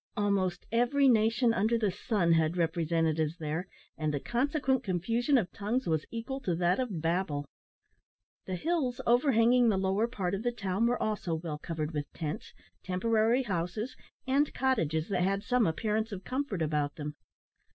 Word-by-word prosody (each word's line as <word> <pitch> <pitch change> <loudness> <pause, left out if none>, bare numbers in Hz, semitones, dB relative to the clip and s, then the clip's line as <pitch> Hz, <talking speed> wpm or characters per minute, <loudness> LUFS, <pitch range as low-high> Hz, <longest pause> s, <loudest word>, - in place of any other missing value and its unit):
Almost 200 -3 0
every 245 +4 +3
nation 230 0 +4
under 220 +3 +2
the 215 -4 +1
sun 190 -3 0
had 160 +1 +2
representatives 165 -1 0
there, 160 +2 -3 0.3
and 155 -1 -1
the 145 - -1
consequent 265 - 0
confusion 230 - +1
of 185 -8 0
tongues 225 +6 -2
was 160 -2 0
equal 235 +4 -4
to 180 -10 -1
that 175 +4 +2
of 210 -11 -2
Babel. 165 -4 0 1.0
The 185 - -2
hills 285 - -1
overhanging 240 -1 +4
the 200 - +2
lower 190 +4 +1
part 195 -7 -3
of 195 - -1
the 240 +1 0
town 200 0 0
were 245 +1 +1
also 205 -6 -1
well 160 -2 -5
covered 155 -1 -3
with 145 -3 -4
tents, 155 -1 -5 0.3
temporary 225 +6 +2
houses, 205 +4 -3 0.3
and 275 +3 +2
cottages 165 - +1
that 185 -3 0
had 195 +2 +1
some 250 -3 +2
appearance 220 +6 -1
of 195 -2 -6
comfort 255 - -2
about 150 -2 -1
them. 150 -1 -5
200 Hz, 160 wpm, -30 LUFS, 165-240 Hz, 1.0 s, nation